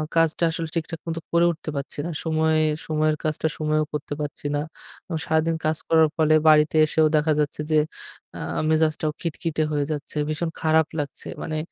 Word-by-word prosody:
কাজটা 165 0 +2
আসলে 165 0 -3
ঠিকঠাক 165 0 -3
মতো 165 0 -2
করে 170 0 +4
উঠতে 160 -1 -7
পাচ্ছি 140 -1 -4
না। 170 - -3
সময়ে 160 -1 +2 0.3
সময়ের 155 0 +1
কাজটা 155 0 0
সময়েও 155 0 +1
করতে 150 -1 -4
পাচ্ছি 145 0 -6
না। 145 - 0 0.5
আ - - -2
সারাদিন 160 +1 +1
কাজ 155 0 +1
করার 160 -1 +5
ফলে 155 -1 +4
বাড়িতে 155 0 +5
এসেও 155 +1 +3
দেখা 155 +1 +2
যাচ্ছে 150 0 -1
যে 155 - +4 0.6
আ - - -7 0.3
মেজাজটাও 155 -1 +2
খিটখিটে 165 -1 -2
হয়ে 145 -1 0
যাচ্ছে। 145 -1 -5
ভীষণ 160 +2 -1
খারাপ 160 0 +3
লাগছে। 145 -2 -4 0.2
মানে 155 - -3
155 Hz, 175 wpm, -24 LUFS, 150-160 Hz, 0.6 s, করার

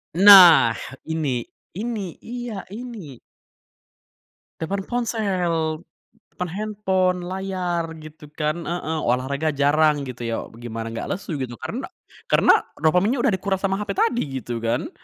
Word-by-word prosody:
Nah 190 -3 +9 0.3
ini 145 -7 -2 0.3
ini, 205 -4 -4
iya, 240 -4 -6
ini! 210 - -8 1.4
Depan 195 +4 -3
ponsel, 180 -9 -1 0.5
depan 180 -1 -3
handphone, 190 -2 0
layar, 185 -2 -2 0.2
gitu 155 -1 -12
kan 155 +2 -2
heeh, 160 -2 -2
olahraga 140 +5 0
jarang 145 +1 +3
gitu 125 -3 -7
ya, 115 - -1 0.2
gimana 115 -1 -6
gak 115 - -5
lesu 175 -5 -5
gitu, 125 -2 -4
karena - - -4 0.4
karena - - +5 0.3
dopaminnya 195 - +2
udah - - +3
dikuras 190 0 -2
sama 195 0 0
HP 210 - -4
tadi 400 - +1 0.2
gitu 120 +1 -4
kan. 115 - -2
175 Hz, 125 wpm, -23 LUFS, 150-200 Hz, 1.4 s, Nah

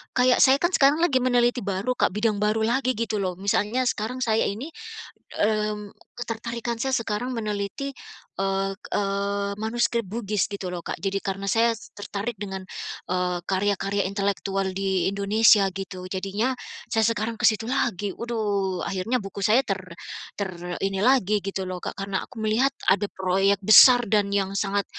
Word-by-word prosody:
kayak 250 0 +4
saya 265 +1 +7
kan 345 - +3
sekarang 295 +2 +4
lagi 275 -7 +3
meneliti 245 0 +2
baru, 200 +3 -2
Kak, - - +2
bidang 210 -1 +1
baru 215 +1 +1
lagi 255 +2 +1
gitu 220 -2 -2
loh. 185 -2 -2
Misalnya 205 +6 0
sekarang 245 +2 -2
saya 220 -1 +2
ini, 245 +11 -5 0.6
mmm, 210 -1 0 0.2
ketertarikan 235 0 -4
saya 265 +1 0
sekarang 230 +3 -2
meneliti, 210 +5 -3 0.5
eee 195 0 0 0.2
eee, 200 0 -1
manuskrip 235 0 0 0.2
Bugis 205 -3 0
gitu 195 -2 -4
lho, 175 -1 -5
Kak. - - -4
Jadi 195 0 -1
karena 195 0 -3
saya 230 +2 +3 0.2
tertarik 205 +2 -4
dengan, 190 -1 -5 0.5
eee, 180 -1 0
karya-karya 195 +1 0
intelektual 195 -1 -1
di 190 -1 0
Indonesia 200 +1 +4
gitu, 190 -1 -6
jadinya 200 +7 -1 0.4
saya 225 - +2
sekarang 230 0 -1
ke - - +3
situ 225 +1 -3
lagi. 210 -7 -1
Waduh, 205 -5 -2
akhirnya 200 +7 -1
buku 195 0 -7
saya 230 +5 +5
ter 195 -1 -2 0.6
ter 200 -2 -2 0.3
ini 195 -1 0
lagi 225 -5 +3
gitu 195 -1 -3
loh, 180 -1 -4
Kak, - - -5
karena 195 -1 -2
aku 240 - -16
melihat 225 +6 +3 0.2
ada 200 +1 +3
proyek 190 +1 +1
besar 245 +2 +9
dan 205 -2 +2
yang 195 -1 0
sangat 200 0 0
205 Hz, 160 wpm, -25 LUFS, 195-235 Hz, 0.6 s, besar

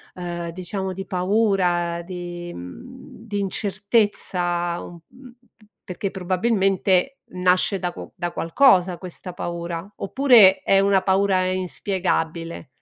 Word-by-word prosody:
ehm, 175 -1 -5
diciamo 185 +2 -4
di 195 +1 -6
paura 180 -3 +1
di, 175 -1 -7
mhmm, 230 - -11
di 205 -1 -3
incertezza, 190 -4 0
mhmm, 170 -1 -12 0.8
perché 190 +2 -4
probabilmente 190 +4 +1
nasce 185 +2 +1
da 180 0 -2
qu - - -9
da 175 -2 -3
qualcosa 180 -1 +3
questa 180 0 -7
paura, 170 -1 -5
oppure 220 -4 +5
é 195 - +3
una 195 -1 +3
paura 190 0 +2
inspiegabile? 180 -3 -2
185 Hz, 110 wpm, -22 LUFS, 175-195 Hz, 0.8 s, oppure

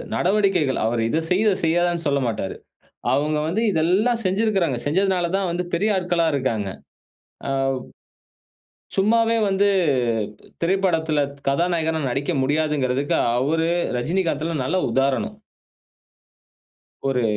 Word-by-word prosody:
நடவடிக்கைகள் 185 -7 +1
அவரு 115 0 0
இது 160 - +1
செய், 185 +3 +2
இத 205 - +4
செய்யாதன்னு 175 0 +1
சொல்லமாட்டாரு. 125 -8 -1 0.6
அவுங்க 150 +2 +1
வந்து 200 +7 0
இதெல்லாம் 200 +9 +2
செஞ்சுருக்குறாங்க. 190 - +1
செஞ்சதனால 180 +1 +1
தான் 195 -2 -1
வந்து 175 +1 -2
பெரிய 205 +6 +1
ஆட்களா 175 -2 +1
இருக்காங்க. 115 -7 -1 0.8
அவ் 135 -1 0 1.2
சும்மாவே 230 +3 +3
வந்து 195 +1 +2 0.9
திரைப்படத்துல 170 -4 +1 0.3
கதாநாயகனா 160 +2 +1
நடிக்க 140 +6 -1
முடியாதுங்கறதுக்கு 145 -2 0 0.2
அவரு, 160 +6 +1 0.3
ரஜினிகாந்த்தெல்லாம் 160 0 -1
நல்ல 185 +8 0
உதாரணம். 135 0 0 1.7
ஒரு 125 -3 +1
165 Hz, 100 wpm, -22 LUFS, 140-190 Hz, 1.7 s, இத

